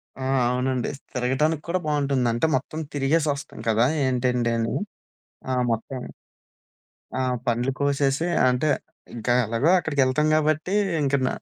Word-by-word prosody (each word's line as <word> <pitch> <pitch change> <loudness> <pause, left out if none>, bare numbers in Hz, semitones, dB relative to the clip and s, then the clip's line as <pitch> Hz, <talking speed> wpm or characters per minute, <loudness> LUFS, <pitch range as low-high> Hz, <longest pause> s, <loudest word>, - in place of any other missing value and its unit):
ఆ! 130 - -7 0.3
అవునండి. 125 0 -1 0.2
తిరగటానికి 135 +5 0
కూడా 185 +2 0
బావుంటుంది. 140 -4 +1
అంటే 120 +7 +1
మొత్తం 145 +4 -3
తిరిగేసొస్తాం 145 -1 0
కదా! 115 +2 +3 0.2
ఏంటేంటి 125 -2 +1
అని. 115 0 -1 0.8
ఆ! - - 0 0.2
మొత్తం 120 +3 -3 1.2
ఆ! - - 0 0.3
పండ్లు 120 +3 +1
కోసేసి 140 +2 +1 0.2
అంటే 125 +4 +1 0.5
ఇంకెలాగో 120 +3 +1
అక్కడికెళ్తాం 145 -3 +1
కాబట్టి, 155 +4 +1 0.3
ఇంక 140 0 +1
న - - +2
135 Hz, 115 wpm, -24 LUFS, 125-150 Hz, 1.2 s, కదా